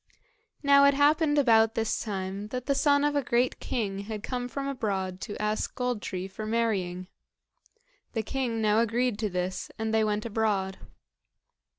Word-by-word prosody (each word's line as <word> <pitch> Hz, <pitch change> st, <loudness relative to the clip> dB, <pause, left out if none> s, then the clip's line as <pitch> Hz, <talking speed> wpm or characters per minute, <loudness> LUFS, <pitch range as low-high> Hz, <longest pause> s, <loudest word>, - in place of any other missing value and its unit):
Now 280 Hz, 0 st, +6 dB
it 280 Hz, 0 st, +5 dB
happened 295 Hz, +1 st, +3 dB
about 225 Hz, -4 st, +4 dB
this 225 Hz, -1 st, 0 dB
time 195 Hz, -1 st, -4 dB
that 250 Hz, +2 st, -5 dB
the 280 Hz, -, +2 dB
son 285 Hz, +1 st, +3 dB
of 295 Hz, 0 st, +1 dB
a 285 Hz, -, +3 dB
great 245 Hz, 0 st, +1 dB
king 200 Hz, -5 st, -2 dB
had 210 Hz, +1 st, -6 dB
come 245 Hz, -1 st, -3 dB
from 275 Hz, +3 st, -4 dB
abroad 195 Hz, -8 st, -2 dB
to 210 Hz, -, -6 dB
ask 210 Hz, 0 st, -1 dB
Gold 250 Hz, -3 st, -1 dB
tree 185 Hz, 0 st, -4 dB
for 215 Hz, +3 st, -7 dB
marrying. 200 Hz, -6 st, -1 dB, 1.1 s
The 225 Hz, -, -1 dB
king 235 Hz, -2 st, -2 dB
now 210 Hz, +1 st, +4 dB
agreed 235 Hz, 0 st, +1 dB
to 215 Hz, -2 st, 0 dB
this, 180 Hz, 0 st, -3 dB
and 220 Hz, 0 st, -2 dB
they 220 Hz, 0 st, +3 dB
went 210 Hz, 0 st, -1 dB
abroad. 205 Hz, -4 st, -1 dB
220 Hz, 170 wpm, -28 LUFS, 205-255 Hz, 1.1 s, Now